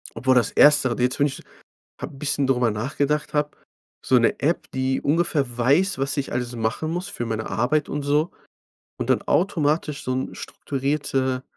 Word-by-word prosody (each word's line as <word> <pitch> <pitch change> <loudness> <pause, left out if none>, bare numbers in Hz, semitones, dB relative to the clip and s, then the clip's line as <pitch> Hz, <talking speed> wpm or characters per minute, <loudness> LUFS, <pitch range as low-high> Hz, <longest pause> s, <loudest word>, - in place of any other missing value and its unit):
Obwohl 130 +3 +2
das 120 -4 +3
erstere, 140 -5 +5
jetzt 125 +3 0
wenn 145 - +4
ich 135 - -6
so - - -14 0.6
habe - - -6
'n - - -14
bisschen 140 -2 0
drüber 125 -4 +2
nachgedacht 140 +8 -1
habe. 150 0 0 0.5
So 130 - +4
'ne 115 - +2
App, 160 +5 -1
die 130 0 -1
ungefähr 145 -5 0
weiß, 145 +11 +2
was 140 +2 -2
ich 140 - -2
alles 120 0 -3
machen 115 +8 -2
muss 180 +2 -3
für 120 - -4
meine 110 -1 -3
Arbeit 145 +6 0
und 145 0 -3
so 150 +4 +1 0.7
und - - -2
dann - - +2
automatisch 155 -5 0
so 130 - -1
'n 130 +1 -3
strukturierte 135 -2 -2
135 Hz, 180 wpm, -23 LUFS, 125-150 Hz, 0.7 s, erstere